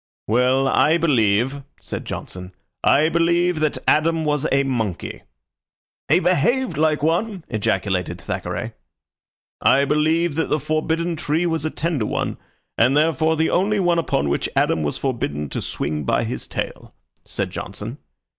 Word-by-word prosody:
"Well, 125 +4 +2
I 155 +4 +4
believe," 130 -3 +2 0.2
said - - -6
Johnson 90 0 -7 0.3
"I 150 +3 +4
believe 170 +1 +2
that 155 -1 0
Adam 160 +1 +3
was 150 -2 0
a 140 0 +3
monkey." 115 -9 -3 0.9
"He 160 +5 +4
behaved 190 - +1
like 155 0 +1
one," 180 +3 0
ejaculated 95 -3 -1
Thackeray. - - -4 0.9
"I 140 +1 +4
believe 155 +3 +2
that 165 - 0
the 155 - +1
forbidden 160 +3 -1
tree 155 +4 0
was 160 -2 -1
a - - +1
tender 155 -9 -2
one, - - -2 0.4
and 125 +5 +4
therefore 160 +1 +2
the 160 +1 +1
only 205 +3 +2
one 175 -2 +2
upon 75 - 0
which 70 - -1
Adam 80 - +2
was 75 -1 -2
forbidden 75 - -2
to - - -4
swing 75 +1 -3
by - - +1
his - - -5
tail," - - -6 0.3
said - - -4
Johnson. - - -6
150 Hz, 145 wpm, -21 LUFS, 120-165 Hz, 0.9 s, I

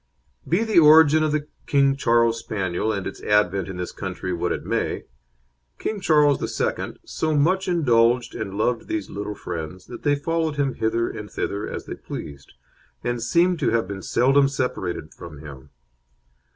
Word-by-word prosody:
Be 180 +7 +2
the 220 -6 +4
origin 155 0 +7
of 155 -1 +1
the 150 -1 -1 0.2
King 140 -1 +3
Charles 115 -3 +2
Spaniel, 95 -1 -2
and 100 -3 -3
its - - -6
advent 100 -3 +2
in 95 -2 -6
this 90 0 -4
country, 95 -1 -5
what 85 - -1
it - - -3
may, - - -1 0.7
King 215 - -3
Charles 150 -4 +4
II. - - -2
so 155 -1 -1
much 185 +6 +2
indulged 120 -8 +2
and 95 - -5
loved 120 +2 0
these 325 -1 -3
little 105 +1 -5
friends 90 0 -6
that 120 - -9
they 145 0 +2
followed 160 +1 -1
him 140 -2 0
hither 115 +1 0
and 105 -1 -7
thither 100 +1 -3
as - - -6
they - - -6
pleased, 70 -1 -9 0.5
and 120 -1 -2
seem 170 +9 +2
to 155 - +1
have 115 -4 +1
been 100 0 -6
seldom 135 +6 +3
separated 125 - -3
from 75 - -10
him. 70 -3 -11
120 Hz, 170 wpm, -23 LUFS, 100-150 Hz, 0.7 s, origin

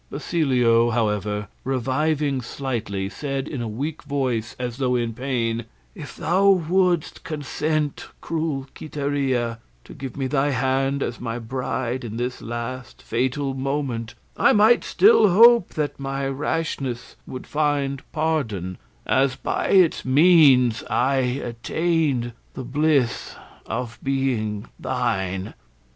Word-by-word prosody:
Basilio, 125 -7 +2
however, 105 -3 -1 0.2
reviving 135 +2 0
slightly, 115 -6 -3
said 135 +5 -4
in 135 -6 -4
a 115 - -3
weak 140 +9 -4
voice, 130 -6 -2
as 125 -1 -4
though 130 -2 +1
in 120 -2 -1
pain, 120 -2 -2 0.3
"If - - -9
thou 190 +4 +2
wouldst 180 -2 +2
consent, 155 -1 -2
cruel 155 -4 -2
Quiteria, 140 -6 -2 0.2
to - - -12
give 135 -4 -7
me 135 - -1
thy 135 +2 +1
hand 135 +1 0
as 120 - -4
my 115 -1 -4
bride 125 +1 -3
in 115 -1 -6
this 125 +1 -3
last 120 +1 -6
fatal 130 +3 -1
moment, 130 -4 -3 0.2
I - - +4
might 220 +3 +5
still 410 - +5
hope 230 +2 +6
that 150 -2 -2
my 135 0 -2
rashness 135 -3 -3
would 130 - -7
find 145 -2 0
pardon, 120 - -2 0.3
as 135 -1 +2
by - - -2
its 185 -4 +4
means 135 -5 +5
I 135 +3 +2
attained 130 +1 -1 0.2
the 130 - -5
bliss 140 -1 0 0.3
of 120 -1 -4
being 125 -6 -1
thine." 95 -7 -2
135 Hz, 125 wpm, -23 LUFS, 120-150 Hz, 0.3 s, hope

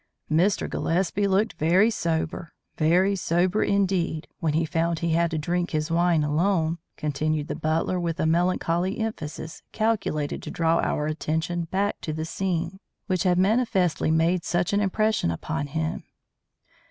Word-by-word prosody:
"Mr. 180 +6 +2
Gillespie 190 +4 0
looked 200 +3 +1
very 185 +8 +4
sober, 165 -3 -2 0.2
very 180 +5 +3
sober 180 +3 +1
indeed, 185 -5 0
when 160 -5 0
he 160 +1 +2
found 165 +1 0
he 170 +1 -1
had 170 +1 +2
to 160 - -2
drink 175 +3 -1
his 155 +1 -2
wine 170 -2 +3
alone," 165 +2 +1 0.2
continued 150 0 -1
the - - -3
butler, 160 +3 0
with 170 -2 -2
a - - +1
melancholy 175 +2 +1
emphasis 165 -8 -5
calculated 195 -10 -1
to - - -7
draw 165 0 +1
our 150 - 0
attention 160 +2 -2
back 195 +4 -1
to 155 - -3
the 155 +1 -3
scene 175 +1 -2 0.3
which 185 -4 0
had 180 -1 +2
manifestly 190 -5 +2
made 165 +2 +2
such 175 +2 0
an 200 - +3
impression 215 - +1
upon 145 - -3
him. 160 +3 -3
170 Hz, 155 wpm, -25 LUFS, 160-190 Hz, 0.3 s, very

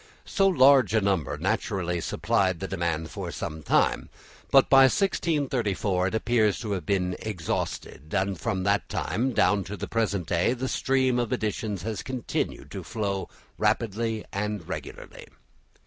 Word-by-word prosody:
So 195 - +2
large 135 - +5
a - - +5
number 95 -7 0
naturally 90 -3 -1
supplied 95 +2 0
the 95 - -4
demand 85 -4 -2
for - - -5
some 80 0 -5
time, - - +1 0.4
but 135 -1 +6
by 135 -1 +7
1634 130 - 0
it 105 - -2
appears 110 -2 +2
to 110 -3 -4
have 90 -6 -3
been 90 -2 0
exhausted; 85 - -4
and 100 0 0
from 95 +5 -2
that 100 +1 +1
time 115 - -1
down 100 -2 +2
to 105 +2 -6
the - - -5
present 105 -6 -1
day 90 +9 +1
the 130 +1 -3
stream 130 -2 +1
of 120 -2 -1
editions 105 -3 -2
has 110 0 -3
continued 130 -3 -4
to - - -5
flow 100 -3 -3 0.3
rapidly 115 0 0
and 105 -3 -3
regularly. - - -8
105 Hz, 150 wpm, -26 LUFS, 95-120 Hz, 0.4 s, by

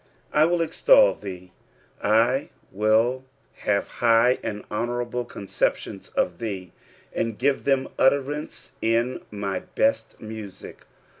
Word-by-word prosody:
"I 150 +1 +5
wiB 175 +1 +1
extol - - +5
thee." 90 -2 -9 0.5
I 115 +6 +2 0.2
nill 110 +6 +2 0.3
have 100 -1 0
high 120 +1 +3
and 105 -1 -4
honourable 120 +2 -2
conceptioiiB 100 - -3
of 85 -1 0
tbee, 95 -5 -5 0.4
■nd 115 -2 -1
give 140 +2 +1
them 135 -1 +2
utterance 140 +2 0
in 115 +3 +1
my 100 -2 -3 0.2
hert 275 +1 +1
music. 110 -3 -9
115 Hz, 115 wpm, -25 LUFS, 105-135 Hz, 0.5 s, I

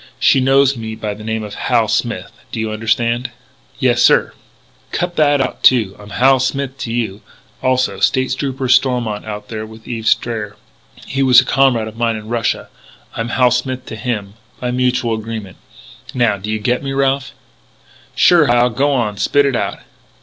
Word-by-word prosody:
She - - +4
knows 135 +1 +3
me 110 -2 -6
by 110 -1 -4
the 105 +1 -11
name 110 0 -3
of 105 -1 -7
Hal - - +1
Smith. - - -2 0.2
Do - - -4
you 110 -1 -2
understand?" 115 +3 0 0.5
"Yes, 120 -2 +2
sir - - +4 0.3
" - - -34
"Cut 175 0 -2
that 145 -2 +3
out, 130 -1 -2
too. 110 -7 +4
I'm 105 0 -12
Hal 130 +5 +3
Smith 135 +1 -2
to 115 - -4
you, 110 -4 -3 0.4
also. 130 -6 0
State 130 +5 +1
Trooper 135 -1 -3
Stormont 125 -4 +1
is - - -7
out 105 0 -7
there 110 -1 -5
with 110 +1 -12
Eve 115 -2 -4
Strayer. 110 -3 0 0.5
He 135 - -2
was 130 -2 +7
a 130 - +1
comrade 130 -5 +2
of 110 0 -10
mine 115 -1 0
in 110 0 -8
Russia. 115 -2 -1 0.5
I'm 115 +1 -3
Hal 125 0 +3
Smith 125 +1 -2
to - - -7
him, 105 -3 -4 0.3
by 125 -1 -2
mutual 125 -2 0
agreement. 110 -3 -6 0.6
Now 120 -4 +2
do 100 +2 -7
you 110 - 0
get 120 +4 0
me, 135 -1 -4
Ralph?" 135 0 0 0.8
"Sure, 170 -5 +5
Hal. 120 0 +3
Go 140 +5 +1
on; 115 -6 -1
spit 145 +6 +2
it 135 -2 0
out!" - - -2
120 Hz, 185 wpm, -17 LUFS, 110-130 Hz, 0.8 s, was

